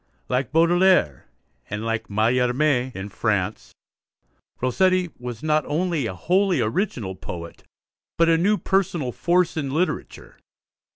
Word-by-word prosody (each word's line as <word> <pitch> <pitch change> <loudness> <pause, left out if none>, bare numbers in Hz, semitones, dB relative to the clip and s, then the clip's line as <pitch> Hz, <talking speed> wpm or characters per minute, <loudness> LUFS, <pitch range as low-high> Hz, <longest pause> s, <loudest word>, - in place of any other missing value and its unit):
Like 125 -1 -1
Baudelaire 170 - +3 0.4
and 105 +2 -4
like 115 -1 -2
Mallarmé 125 +5 +1
in 95 +1 -6
France, 95 - -2 0.9
Rossetti 185 +7 +1
was 120 -1 -7
not 155 -1 +2
only 160 -3 -1
a 95 - -5
wholly 185 - +1
original 110 - -2
poet, 85 -2 -8 0.5
but 165 - +4
a 165 - +5
new 200 +6 +2
personal 175 -10 0
force 175 +6 +1
in 145 -4 -2
literature. 165 +7 -3
135 Hz, 120 wpm, -23 LUFS, 110-175 Hz, 0.9 s, a